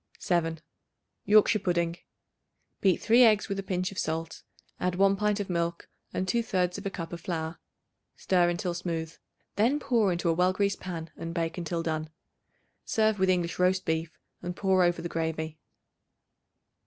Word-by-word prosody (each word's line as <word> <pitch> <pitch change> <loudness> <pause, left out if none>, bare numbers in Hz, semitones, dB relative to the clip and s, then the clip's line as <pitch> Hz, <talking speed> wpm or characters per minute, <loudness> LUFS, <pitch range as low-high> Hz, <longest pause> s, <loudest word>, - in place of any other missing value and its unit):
7. 165 -2 0 0.7
Yorkshire 215 +1 +5
Pudding. 170 -2 0 0.9
Beat 190 -3 +3
3 235 +3 +5
eggs 215 -3 +4
with 195 -2 -3
a - - 0
pinch 185 -1 -2
of 195 - -5
salt; 160 +1 -3 0.4
add 180 0 0
1 195 +1 +4
pint 210 +1 0
of 200 - -2
milk 170 -1 -2 0.2
and 185 - -1
2/3 185 -4 0
of 200 - -4
a - - -1
cup 170 -3 -6
of 170 - -6
flour. 165 -1 -4 0.6
Stir 180 -2 +2
until 175 +1 -2
smooth. 165 -2 -3 0.4
Then 245 +8 +3
pour 230 -9 +2
into 175 0 -1
a 165 - +4
well 180 +2 +2
greased 200 0 0
pan 165 -3 -6
and 165 +1 -6
bake 165 0 -2
until 170 0 -2
done. 155 -1 -2 0.7
Serve 220 -2 +1
with 190 0 +3
English 175 -2 0
roast 185 +1 +2
beef, 160 -1 -2 0.2
and 175 0 -4
pour 190 -1 +2
over 175 -1 +1
the - - -2
gravy. 160 -1 -3
180 Hz, 165 wpm, -28 LUFS, 165-195 Hz, 0.9 s, Yorkshire